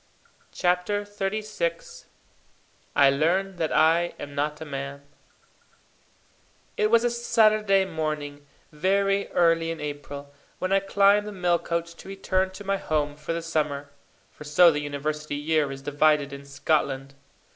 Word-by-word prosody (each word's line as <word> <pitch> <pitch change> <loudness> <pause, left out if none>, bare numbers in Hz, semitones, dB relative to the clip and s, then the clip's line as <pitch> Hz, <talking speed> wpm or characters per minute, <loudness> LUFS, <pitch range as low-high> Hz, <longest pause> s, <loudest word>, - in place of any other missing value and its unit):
CHAPTER 180 +3 0
XXXVI 215 - -4 0.9
I 140 -1 +6
Learn 180 +7 0
that 160 -2 -1
I 170 +2 +3
am 145 - -7
not 150 +1 -2
a 160 - -7
Man 140 0 -6 1.7
It 210 - +1
was 230 +1 +4
a 240 - +1
Saturday 215 -4 +3
morning, 150 -4 -4 0.2
very 195 +5 +1
early 165 -1 +2
in 165 -1 -4
April, 145 -1 -7 0.2
when 185 +1 -1
I 195 - +5
climbed 200 +1 +3
the - - -5
mail 180 -3 +1
coach 170 0 -3
to - - -13
return 190 -1 -1
to 190 +2 -10
my 195 0 0
home 150 -5 -1
for 150 +2 -6
the 165 0 -3
summer; 150 -3 -2 0.4
for - - -12
so 160 +4 +6
the 150 - -2
university 150 +1 -4
year 150 -1 0
is 135 0 -8
divided 145 0 +2
in 140 0 -9
Scotland. 140 -1 -1
165 Hz, 145 wpm, -25 LUFS, 145-195 Hz, 1.7 s, I